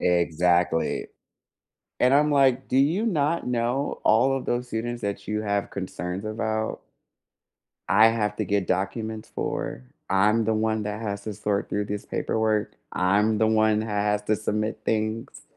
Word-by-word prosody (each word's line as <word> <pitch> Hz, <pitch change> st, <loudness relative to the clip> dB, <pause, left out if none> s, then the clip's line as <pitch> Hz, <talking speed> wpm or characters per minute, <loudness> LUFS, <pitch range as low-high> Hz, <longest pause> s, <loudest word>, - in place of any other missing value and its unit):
Exactly, 85 Hz, -1 st, +1 dB, 0.9 s
and 125 Hz, +1 st, +4 dB
I'm 150 Hz, +2 st, +4 dB
like, 135 Hz, -3 st, +3 dB
"Do 130 Hz, -, +1 dB
you 160 Hz, +11 st, +3 dB
not 165 Hz, -, 0 dB
know 125 Hz, +3 st, -1 dB
all 125 Hz, +5 st, +4 dB
of 135 Hz, -, -4 dB
those 125 Hz, +1 st, -1 dB
students 120 Hz, +1 st, -3 dB
that 100 Hz, 0 st, -3 dB
you 105 Hz, 0 st, -1 dB
have 100 Hz, -1 st, -1 dB
concerns 95 Hz, 0 st, -5 dB
about, 110 Hz, 0 st, -2 dB, 1.1 s
I 110 Hz, +3 st, +7 dB
have 105 Hz, -2 st, 0 dB
to -, -, -1 dB
get 100 Hz, -2 st, 0 dB
documents 110 Hz, +4 st, -2 dB
for, 65 Hz, -, -3 dB, 0.3 s
I'm 105 Hz, +3 st, +3 dB
the 110 Hz, -, +2 dB
one 110 Hz, 0 st, 0 dB
that 105 Hz, +1 st, -4 dB
has 100 Hz, -2 st, -4 dB
to 110 Hz, -, -4 dB
sort 105 Hz, 0 st, -1 dB
through 105 Hz, 0 st, -1 dB
this 105 Hz, 0 st, -5 dB
paperwork, 110 Hz, -2 st, -1 dB, 0.2 s
I'm 105 Hz, +4 st, +2 dB
the 110 Hz, -, +3 dB
one 110 Hz, -1 st, +3 dB
who 110 Hz, -, -5 dB
has 105 Hz, 0 st, 0 dB
to 110 Hz, 0 st, +1 dB
submit 110 Hz, 0 st, -2 dB
things?" 110 Hz, +1 st, -2 dB
110 Hz, 160 wpm, -25 LUFS, 100-115 Hz, 1.1 s, I